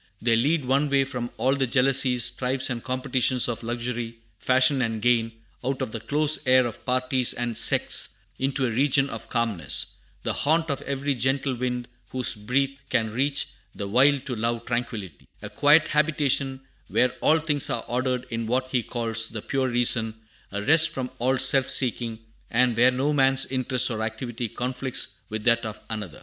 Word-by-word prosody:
They 115 0 +2
lead 145 +5 +1
one 135 +3 +2
away 140 -1 +2
from 125 -3 -5
all 130 +1 +1
the 135 -2 0
jealousies, 125 -1 +2
strifes, 130 +1 -1
and 120 -2 -4
competitions 130 -1 0
of 120 -1 -4
luxury, 120 0 -4 0.2
fashion, 130 +1 +3
and 115 -2 -2
gain, 115 0 +2 0.3
out 135 0 -2
of - - -3
the 115 - -5
close 150 +5 +2
air 130 0 +5
of 120 - -6
parties 130 0 +2
and 120 -1 -3
sects, - - +4 0.2
into 135 0 0
a 120 - -1
region 140 +3 +2
of - - -8
calmness, 110 - -1 0.3
"The - - -1
haunt 160 +1 +1
Of 140 - -3
every 140 +1 -1
gentle 135 +1 0
wind 125 0 -3 0.2
whose 130 -1 -1
breath 135 +6 -1
can 110 -1 -1
teach 140 +2 -1 0.3
The 100 - -5
wild 135 +5 +3
to 125 - -3
love 115 +1 -2
tranquillity," 115 - -5 0.2
a - - -7
quiet 150 +2 +4
habitation 145 -3 +1 0.3
where 125 0 +2
all 155 - +4
things 150 -3 0
are - - -2
ordered 125 +1 -1
in 115 -1 -3
what 130 +2 -1
he 125 - +1
calls 115 -1 -1
"the 110 -2 -7
pure 135 -1 -1
reason;" 120 -2 +1 0.4
a 100 +1 -4
rest 160 +5 +5
from 130 -1 -5
all 130 +2 +1
self 135 0 +2
seeking, 120 -3 0 0.3
and 120 0 +2
where 120 +3 +5
no 135 +4 0
man's 135 -1 +3
interest 130 -1 +2
or 110 -1 -3
activity 115 +1 -4
conflicts 125 +2 -2 0.2
with 110 0 -5
that 115 0 +3
of 110 -2 -6
another. 105 -8 -6
125 Hz, 180 wpm, -25 LUFS, 115-135 Hz, 0.4 s, air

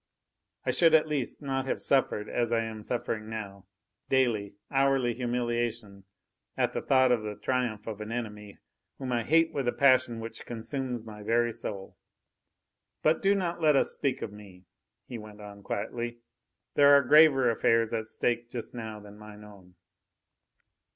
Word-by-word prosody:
I - - +2
should 165 -2 +5
at 155 0 +4
least 145 -1 -3
not 135 -1 -2
have - - -1
suffered, 125 -6 +1
as 120 -1 -1
I 115 -1 +2
am 110 -1 -6
suffering 110 -1 -3
now, 100 -4 -7 0.4
daily, 115 -7 +1 0.2
hourly 135 -3 +2
humiliation 120 -4 -3 0.5
at - - +1
thought 130 -2 +3
of 120 -3 +2
the 105 -1 -5
triumph 125 -5 -2
of 110 -2 -6
an 105 +1 -6
enemy, 105 -4 -6 0.4
whom 130 -2 -5
I 120 -1 +1
hate 165 +6 +3
with 135 -3 -2
a - - +3
passion 130 -4 +3
which 115 0 -8
consumes 120 0 -5
my 105 -1 -10
very 120 +2 +1
soul. 105 -4 -7 1.1
But 155 +1 +3
do 200 +1 +3
not 175 -3 -2
let 155 -2 +4
us - - +2
speak 135 -3 -2
of 105 - -6
me," 100 -3 -14 0.4
he 120 -3 -7
went 105 -1 -12
on 100 -1 -11
quietly. 120 +4 -4 0.6
"There 145 0 +7
are 140 - +3
graver 135 -2 +6
affairs 115 0 +2
at 110 -1 -2
stake 120 +1 -1
just 120 -2 -6
now 110 -3 -6
than 105 0 -14
mine 105 0 -12
own." 95 -4 -16
120 Hz, 165 wpm, -28 LUFS, 105-130 Hz, 1.1 s, There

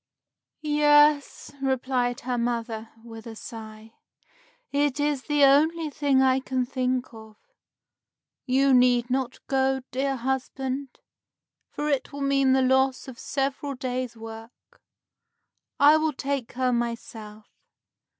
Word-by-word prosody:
"Yes," 295 -1 +3
replied 255 -2 -1
her 250 0 -2
mother 230 -2 -3
with 225 -1 -11
a 225 - -8
sigh, 220 0 -10 0.8
"it 285 0 0
is 290 -3 -1
the 295 -1 +2
only 310 +3 +4
thing 280 -3 +2
I 260 0 +3
can 260 -1 -2
think 255 -1 -2
of. 220 -1 -13 1.1
You 270 +1 +3
need 245 -1 +3
not 260 -1 -2
go, 265 0 +1
dear 270 +1 -1
husband, 265 +1 -4 0.7
for 295 - -4
it 280 -3 -1
will 285 - -7
mean 275 -1 +3
the 265 0 +3
loss 265 +1 +2
of 255 -3 -10
several 275 0 -3
days' 250 -2 -4
work. 225 +1 -12 1.0
I 295 +2 +7
will 315 -1 0
take 275 -2 -3
her 255 0 0
myself. 225 -3 -5
260 Hz, 120 wpm, -25 LUFS, 240-275 Hz, 1.1 s, I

